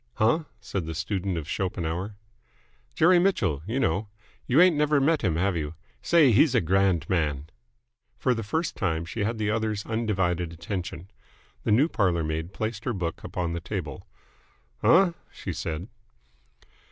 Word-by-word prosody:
"Huh?" 135 +9 +2
said 90 -5 -4
the 80 - -4
student 95 +1 -2
of 80 -2 -5
Schopenhauer. 90 +2 -3 0.8
"Jerry 175 +2 +5
Mitchell, 100 - +1
you 120 +5 -1
know. 100 -1 0 0.4
You 130 +5 +4
ain't 180 -2 +6
never 150 0 +3
met 155 +3 +2
him, 90 -7 +1
have 95 +3 +1
you? 75 -1 -3 0.3
Say, 160 -7 +5
he's 135 +5 +4
a - - +6
grand 95 -3 +2
man!" 75 -4 -1 0.7
For 130 - +2
the 115 - -3
first 160 +10 -2
time 80 0 -1
she 100 +6 -3
had 115 +2 -1
the 105 -1 0
other's 110 -2 -1
undivided 95 -7 -1
attention. 90 0 -6 0.5
The - - +1
new 130 +9 +5
parlour 90 - +1
maid 80 +2 -3
placed 110 +1 -4
her 120 - 0
book 90 -5 -4
upon 85 -2 -3
the 85 - -2
table. - - -5 0.7
"Uh?" 185 +1 +5 0.2
she - - -6
said. 80 +3 -4
100 Hz, 160 wpm, -26 LUFS, 85-120 Hz, 0.8 s, ain't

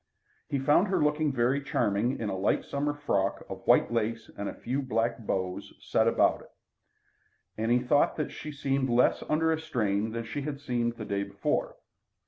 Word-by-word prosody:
He 140 - 0
found 145 +8 +3
her 190 - +1
looking 150 0 +2
very 130 +2 +1
charming 115 -1 0
in 110 - -2
a 100 - -2
light 95 +2 +1
summer 145 +1 -1
frock 100 -10 -1
of - - -7
white - - +4
lace 115 0 -1
with 100 - -6
a - - -4
few 130 +4 -2
black 115 -2 -1
bows 95 -3 -3
set - - +1
about - - +3
it, - - -16 1.1
and 110 +2 -1
he 120 - +5
thought 135 +3 +3
that 155 - -3
she 150 - -7
seemed 135 -2 -1
less 120 +1 +3
under 160 +1 +2
a 160 - 0
strain 105 -7 0
than 115 +1 -3
she 130 +5 -4
had 140 0 -4
seemed 120 -4 -1
the 115 -2 -7
day 100 -1 -1
before. 100 0 -2
120 Hz, 190 wpm, -29 LUFS, 110-145 Hz, 1.1 s, he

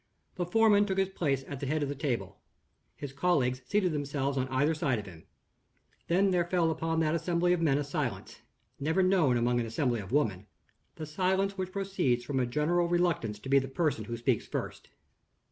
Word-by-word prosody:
The 175 -2 -3
foreman 205 +1 +4
took 190 -1 -2
his 195 -1 +2
place 140 -8 -1
at 140 - -6
the 140 - -4
head 155 +2 0
of - - -1
the - - -2
table. 120 - -3 0.5
His 140 -2 -7
colleagues 135 -5 +1
seated 190 0 +1
themselves 140 -2 -2
on 130 -1 0
either 140 +4 +1
side 150 -6 0
of 105 - -6
him. 85 -4 -13 0.8
Then 190 +3 +3
there 175 -1 +2
fell 175 -3 +2
upon 165 +1 -1
that 155 0 +1
assembly 175 +1 +1
of 175 - -1
men 145 -4 +3
a 145 - -1
silence, 145 - -4 0.4
never 160 +6 +1
known 175 -10 +3
among 120 +1 +1
an 115 - -2
assembly 120 0 0
of 95 -2 -8
women 105 -9 0 0.5
the 155 - -6
silence 190 +5 0
which 185 -1 -4
proceeds 185 -11 0
from 135 +2 -2
a 125 - +1
general 160 +7 +1
reluctance 170 -11 0
to - - -9
be 140 0 +6
the 135 - -4
person 135 -6 -1
who 120 +1 -5
speaks 120 -1 0
first. - - -5
150 Hz, 200 wpm, -30 LUFS, 130-175 Hz, 0.8 s, be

